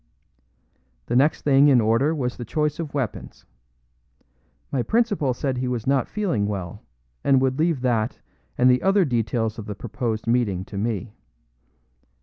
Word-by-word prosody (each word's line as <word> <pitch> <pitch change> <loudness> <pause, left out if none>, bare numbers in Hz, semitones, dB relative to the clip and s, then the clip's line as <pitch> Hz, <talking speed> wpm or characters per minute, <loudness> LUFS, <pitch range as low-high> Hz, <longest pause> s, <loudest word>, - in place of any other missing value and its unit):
The - - -2
next 145 +5 +3
thing 140 0 +5
in 135 -4 +6
order 115 +8 +2
was 125 -4 -2
the 120 - -7
choice 150 +5 -1
of 155 -3 -5
weapons. 130 -7 -4 1.3
My 130 - 0
principal 210 - +1
said 130 +1 -2
he 130 - -2
was 125 -3 -3
not 135 -2 +1
feeling 175 - -1
well, 100 -1 -5 0.4
and 135 -2 +4
would 130 +1 0
leave 160 -4 +1
that 120 -3 0 0.4
and 125 - +4
the 125 0 +4
other 195 -1 +3
details 115 -3 -1
of 105 - -8
the 105 - -5
proposed 115 0 -4
meeting 115 -6 0
to 100 - -8
me. 105 -1 -3
125 Hz, 155 wpm, -23 LUFS, 110-140 Hz, 1.3 s, in